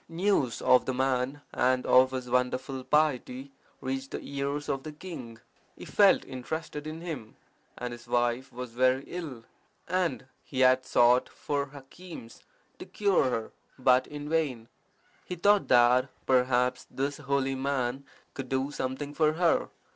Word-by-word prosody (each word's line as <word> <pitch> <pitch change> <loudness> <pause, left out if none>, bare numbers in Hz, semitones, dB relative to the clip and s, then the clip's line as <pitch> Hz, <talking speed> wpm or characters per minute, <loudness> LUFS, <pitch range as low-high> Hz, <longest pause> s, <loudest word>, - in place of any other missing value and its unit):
News 165 - 0
of 125 - +5
the 130 - -1
man 130 +2 0
and 130 0 +2
of 130 0 +6
his 130 -1 -5
wonderful 130 +2 -1
piety 140 -2 0 0.3
reached 135 0 -3
the - - -4
ears 140 +1 -3
of 135 - -1
the 155 - -7
king. 150 -8 -9 0.4
He - - -9
felt 200 -2 +4
interested 150 +3 -5
in 155 +1 -6
him, 155 -11 -6 0.4
as 125 0 -4
his 120 0 -10
wife 120 +2 0
was 125 -1 -7
very 130 +2 +2
ill; 145 -10 -7 0.4
and 180 -6 -1 0.2
he 130 -2 -3
had 130 0 +4
sought 120 0 +4
for 145 -1 -3
hakims 140 -1 -12 0.4
to - - -8
cure 200 -7 +2
her, 115 -3 -3 0.3
but 130 0 +4
in 145 0 -7
vain. 145 -8 -1 0.6
He 180 - -4
thought 200 +4 +3
that, 125 +2 +5 0.2
perhaps, 125 0 +2
this 140 +1 -2
holy 140 -1 0
man 135 -1 -1 0.3
could 135 -2 -6
do 135 +1 -1
something 140 +1 -4
for 155 0 +2
her. 170 +1 +2
135 Hz, 150 wpm, -29 LUFS, 125-150 Hz, 0.6 s, of